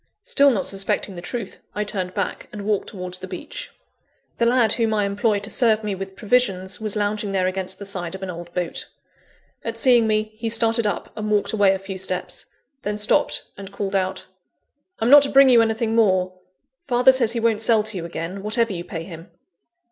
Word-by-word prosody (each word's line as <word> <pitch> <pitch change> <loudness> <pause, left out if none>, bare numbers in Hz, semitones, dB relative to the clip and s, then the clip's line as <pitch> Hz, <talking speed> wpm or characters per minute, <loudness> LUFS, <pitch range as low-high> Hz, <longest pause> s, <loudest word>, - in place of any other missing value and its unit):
Still 280 0 +4
not 210 -8 0
suspecting 195 0 -1
the 175 - -7
truth, 200 +3 -5 0.2
I 210 - -1
turned 185 -3 -4
back, - - -4
and 205 -1 -7
walked 210 -2 -1
towards 180 -3 -5
the 185 - -8
beach. - - -7 0.7
The 235 - +3
lad 235 -3 +3
whom 225 -2 0
I 205 -1 +1
employ 205 +2 0
to 205 - -7
serve 220 -4 +3
me 210 -1 -2
with 190 0 -7
provisions, 195 -5 0
was 215 -1 -1
lounging 205 -1 -2
there 185 -1 +1
against 185 0 -2
the 200 - -8
side 185 -3 -2
of 190 - -8
an 185 - -4
old 175 0 -9
boat. 180 -1 -3 0.8
At 230 0 -4
seeing 240 -2 +4
me, 215 0 0
he 225 +1 -4
started 230 0 +3
up, 205 - -4
and 215 0 -4
walked 205 -1 +1
away 200 -3 +4
a - - -3
few 195 0 -7
steps 185 -1 0 0.3
then 210 0 -3
stopped, 210 0 +3
and 195 0 -10
called 195 0 -4
out 190 -1 -1 0.7
"I'm 230 +3 +1
not 290 0 +10
to 280 - +1
bring 275 0 +6
you 240 -2 +6
anything 225 0 0
more; 185 -5 +2 0.5
father 250 0 +5
says 240 -3 +2
he 235 - -1
won't 225 -2 +1
sell 225 -1 +4
to 215 0 -5
you 175 - -4
again, 170 +3 -6
whatever 215 +1 +1
you 175 -1 -5
pay 165 -1 -6
him." 165 0 -11
205 Hz, 210 wpm, -22 LUFS, 190-225 Hz, 0.8 s, not